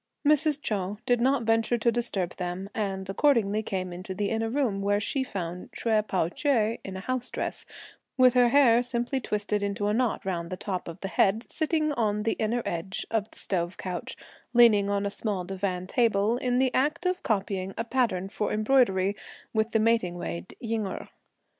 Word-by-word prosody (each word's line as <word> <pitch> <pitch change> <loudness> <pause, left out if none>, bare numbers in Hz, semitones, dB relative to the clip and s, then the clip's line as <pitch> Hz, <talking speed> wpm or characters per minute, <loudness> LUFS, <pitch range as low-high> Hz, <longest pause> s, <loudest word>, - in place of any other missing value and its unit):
Mrs. 300 -1 +3
Chou 200 -1 -2
did 245 -1 +2
not 265 0 +2
venture 225 +1 +2
to 235 +1 +2
disturb 210 -7 -2
them, 180 +2 -4
and 195 -3 -3
accordingly 215 -1 +2
came 185 -4 -3
into 185 +2 -6
the 200 +1 -1
inner 225 0 0
room, 235 -6 0
where 205 +1 +2
she 265 +6 -1
found 180 -7 -5
Hsüeh 215 -2 +1
Pao 180 -4 +1
ch'ai 230 - +1
in 190 -1 -6
a - - -6
house 255 +2 -2
dress, - - -4 0.5
with 255 -1 +6
her 245 -1 +5
hair 240 -3 +5
simply 245 +2 -1
twisted 210 -3 -1
into 200 0 -2
a 210 - +2
knot 240 -3 0
round 170 -3 -2
the 185 - -4
top 185 -1 -4
of 170 - -7
the 195 - -2
head, 195 +5 +2
sitting 310 -1 0
on 210 -5 0
the 225 - +1
inner 230 +2 0
edge 170 +3 -3
of 220 -2 0
the - - -19
stove 175 -1 -2
couch, 185 +7 -5 0.4
leaning 215 -4 +6
on 200 0 0
a 200 - -1
small 200 -4 -2
divan 185 0 -3
table, 220 0 +2
in 250 -1 0
the 260 0 +2
act 295 +7 +1
of 365 0 0
copying 195 -3 -1
a 230 - 0
pattern 230 -7 0
for 210 +1 -2
embroidery, 210 -4 +3 0.4
with 220 0 +1
the 225 - +1
waiting 215 -6 +2
maid 85 - -6
Ying 225 -3 -2
Erh. - - -6
215 Hz, 190 wpm, -27 LUFS, 195-240 Hz, 0.5 s, with